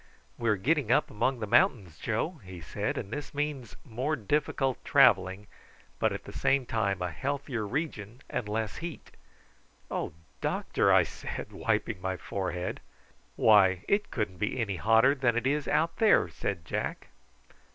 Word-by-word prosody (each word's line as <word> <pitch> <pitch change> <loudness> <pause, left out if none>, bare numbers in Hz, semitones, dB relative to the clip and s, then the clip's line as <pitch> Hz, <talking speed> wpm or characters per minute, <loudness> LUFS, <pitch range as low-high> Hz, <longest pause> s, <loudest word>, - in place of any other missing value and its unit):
"We 115 -1 -1
are 105 - +4
getting 130 - +1
up 150 +4 +3
among 130 +5 0
the - - -1
mountains, 95 -6 +2
Joe," 145 +9 -2
he 95 -2 -9
said; 80 - -3
"and 100 - -5
this 145 -1 -6
means 145 -6 -3
more 130 +5 -1
difficult 135 +2 -1
travelling, 95 +3 +4 0.5
but - - +2
at - - -5
the - - -10
same 135 -2 +2
time 100 -5 -1
a 90 - -2
healthier 130 - -3
region 120 -4 -4
and 105 - -3
less 110 0 -2
heat." 170 -1 -7 0.8
"Oh, - - -3 0.3
doctor!" - - +1
I - - +6
said, - - -7
wiping 90 - -1
my 95 0 -2
forehead. 90 -2 -3 0.6
"Why, 95 -3 +5
it 205 +1 +1
couldn't 105 -6 -3
be 105 +5 -1
any 100 -5 -1
hotter 115 +7 +5
than 125 -4 +1
it 120 - -1
is 145 +1 0
out 155 +3 +1
there!" 220 -2 +5
said 90 -5 -4
Jack. - - -4
115 Hz, 160 wpm, -29 LUFS, 100-140 Hz, 0.8 s, I